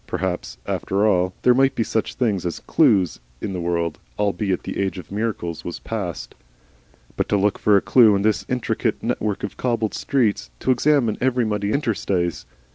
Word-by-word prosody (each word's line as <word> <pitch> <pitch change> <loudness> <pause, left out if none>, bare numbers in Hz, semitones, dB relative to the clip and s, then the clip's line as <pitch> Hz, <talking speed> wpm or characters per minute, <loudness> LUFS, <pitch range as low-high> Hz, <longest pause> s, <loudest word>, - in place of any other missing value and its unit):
Perhaps, 90 -1 -3
after 100 +2 0
all, 90 -3 +2
there 125 - +6
might 135 +1 +3
be 115 - +1
such 110 0 -2
things 105 -8 0
as 85 -2 -3
clues 95 -4 +3 0.2
in 95 - -4
the 90 - -3
world, 85 -2 -1 0.2
albeit 100 -2 0
the - - -5
age 95 -1 -1
of 90 - -9
miracles 100 -6 -3
was 85 - -5
past. 95 -7 -5 0.8
But - - -1
to 105 - +3
look 100 +1 +1
for 105 -1 +4
a - - +2
clue 115 -5 +5
in 100 - 0
this 105 -4 +1
intricate 125 -1 -1
network 105 -2 -2
of 100 - -5
cobbled 115 -4 -1
streets, 105 - 0
to - - +2
examine 130 -3 +2
every 125 -2 +2
muddy 105 -1 -1
interstice! 95 - -1
105 Hz, 180 wpm, -22 LUFS, 90-115 Hz, 0.8 s, there